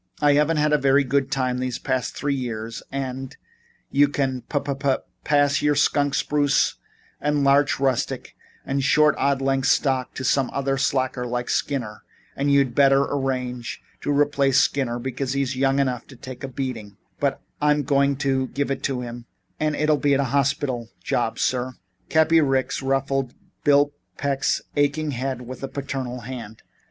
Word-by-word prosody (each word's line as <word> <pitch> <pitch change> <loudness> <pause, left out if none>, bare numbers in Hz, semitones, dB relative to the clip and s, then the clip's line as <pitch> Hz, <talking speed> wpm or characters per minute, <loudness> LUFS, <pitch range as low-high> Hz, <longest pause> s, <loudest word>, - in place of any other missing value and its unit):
I 145 -1 +4
haven't 150 +2 +3
had 150 0 +2
a 150 - +4
very 140 +1 +4
good 135 +1 0
time 130 -2 0
the 130 0 -2
past 130 -2 -1
three 140 +1 0
years 115 -4 -4
and 130 -1 -3
and 135 - -9 0.5
you 145 +1 +5
can 135 -3 -1
pa 145 - -1
pa 140 -1 0 0.3
pass 145 -1 +3
your 150 0 +2
skunk 145 -1 +2
spruce 145 -1 +2 0.4
and 150 -1 +1
larch 140 +1 +3
rustic 135 -3 -1 0.3
and 135 0 -1
short 150 +1 +4
odd 140 -1 +1
length 135 0 +1
stock 130 -3 +1
to 130 - -4
some 135 0 +2 0.3
slacker 130 -2 0
like 120 0 -2
Skinner 120 -7 -2 0.3
and 140 +1 0
you'd 140 -3 +3
better 135 +1 +5
arrange 125 -3 -3 0.2
to - - -1
replace 140 -2 +2
Skinner, 125 -4 +1
because 130 +1 -3
he's 135 -1 -1
young 135 +1 +2
enough 130 -3 0
to 135 - -13
take 130 +1 -9
a - - -2
beating 120 -6 -5 0.2
and 140 -1 +2 0.3
I'm 150 0 +3
going 140 0 +2
to 135 -1 +1
give 140 +2 -2
it 135 - -2
to 130 -3 -1
him 120 0 -8 0.3
and 155 -1 0
it'll 150 0 +2
be 140 -1 +2
a 140 - +2
hospital 135 -3 0
job - - -1
sir 130 0 -1 0.2
" 90 - -42
Cappy 160 +1 +4
Ricks 135 -2 0
ruffled 135 -1 -1 0.3
Bill 145 0 +4 0.2
Peck's 140 -1 0
aching 145 +1 +1
head 130 0 -3
with 130 +2 -8
a 135 - -3
paternal 135 -2 -4
hand. 115 -2 -8
135 Hz, 170 wpm, -23 LUFS, 130-145 Hz, 0.5 s, you